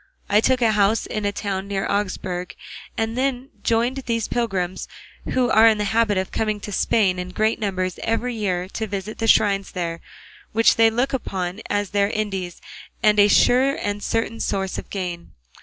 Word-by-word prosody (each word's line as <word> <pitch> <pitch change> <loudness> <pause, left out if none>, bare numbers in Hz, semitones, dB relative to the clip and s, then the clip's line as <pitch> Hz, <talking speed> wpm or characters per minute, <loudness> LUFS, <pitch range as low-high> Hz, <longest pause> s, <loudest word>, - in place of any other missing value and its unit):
I 210 +1 +5
took 255 +1 +2
a 225 - +4
house 210 +1 +2
in 215 -1 -3
a 200 - +1
town 200 -1 -3
near 195 -1 -2
Augsburg, 185 -3 -2 0.4
and 225 0 -1
then 260 0 -1
joined 235 +4 +1
these 230 -4 -2
pilgrims, 190 -6 -2 0.5
who 250 -2 +2
are 220 +1 +7
in 220 -1 +4
the 210 - -1
habit 220 -3 +2
of 190 0 -2
coming 215 -1 -1
to 205 - -6
Spain 190 -2 +2
in 180 0 -5
great 215 +4 0
numbers 185 -3 -2
every 235 +2 -1
year 185 -5 -2
to 220 +2 -4
visit 200 +2 -5
the 225 - 0
shrines 200 -3 +3
there, 170 -2 -3 0.5
which 225 +1 +4
they 225 0 +5
look 245 +5 -1
upon 190 -5 -3
as 205 -1 -1
their 200 -1 +2
Indies 195 -5 -3 0.4
and 210 -1 +4
a 205 - +7
sure 255 +6 +4
and 205 0 -3
certain 225 +1 -2
source 195 -1 -2
of - - -9
gain. 180 -3 -5
210 Hz, 185 wpm, -22 LUFS, 190-225 Hz, 0.5 s, are